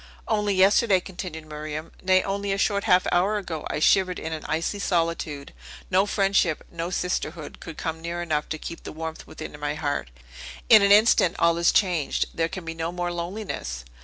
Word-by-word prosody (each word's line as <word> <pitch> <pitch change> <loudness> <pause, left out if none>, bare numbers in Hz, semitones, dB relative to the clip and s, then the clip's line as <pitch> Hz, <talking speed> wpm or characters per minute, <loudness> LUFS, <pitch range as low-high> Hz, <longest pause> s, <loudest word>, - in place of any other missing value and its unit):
"Only 210 -2 +1
yesterday," 195 +1 +5
continued 175 -4 -7
Miriam; 155 +1 -6
"nay, 185 0 +3
only 200 0 -2
a 195 - 0
short 200 0 +1
half 180 0 +4
hour 195 +4 +2
ago, 175 -6 -5
I - - -2
shivered 185 +3 +3
in 160 0 -4
an 155 - -5
icy 165 +6 -1
solitude. 165 -6 -1 0.4
No 190 +2 +3
friendship, 195 -5 +1
no 170 0 -4
sisterhood, 170 -3 -3
could 165 -2 -9
come 160 0 -4
near 170 +1 -4
enough 155 -3 -1
to 160 - -3
keep 165 +2 -8
the - - -8
warmth 160 0 -6
within - - -8
my 145 0 -2
heart. 145 - -2 0.6
In 220 -2 +9
an 200 0 +4
instant 205 -4 +5
all 170 0 +3
is 170 - +4
changed! 180 -7 +1
There 165 0 0
can 185 -1 -7
be 165 - -4
no 165 +1 -3
more 175 0 -3
loneliness!" 170 - -5
175 Hz, 190 wpm, -25 LUFS, 160-195 Hz, 0.6 s, In